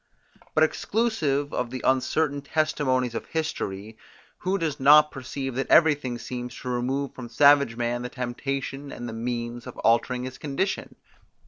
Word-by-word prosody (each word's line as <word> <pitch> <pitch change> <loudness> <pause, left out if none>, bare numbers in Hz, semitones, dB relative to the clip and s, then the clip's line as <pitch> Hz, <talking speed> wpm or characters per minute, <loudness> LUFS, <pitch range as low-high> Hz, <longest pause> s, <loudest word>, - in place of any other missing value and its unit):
But 155 - +5
exclusive 155 -7 0
of 125 - -1
the 130 +1 -6
uncertain 140 +3 +1
testimonies 140 -5 0
of - - -5
history, 110 -9 -4 0.4
who 190 +2 0
does 160 -6 -2
not 150 +3 +7
perceive 135 0 -5
that 135 +2 -2
everything 145 -7 +4
seems 125 0 -6
to 125 - -5
remove 130 +3 -1
from 125 -2 -8
savage 140 0 +5
man 120 0 -1
the 125 - -4
temptation 135 +3 -4
and 120 - -6
the 115 - -6
means 120 +1 -4
of - - -9
altering 120 +2 +2
his 130 0 -7
condition? 150 +7 -2
130 Hz, 150 wpm, -26 LUFS, 120-145 Hz, 0.4 s, not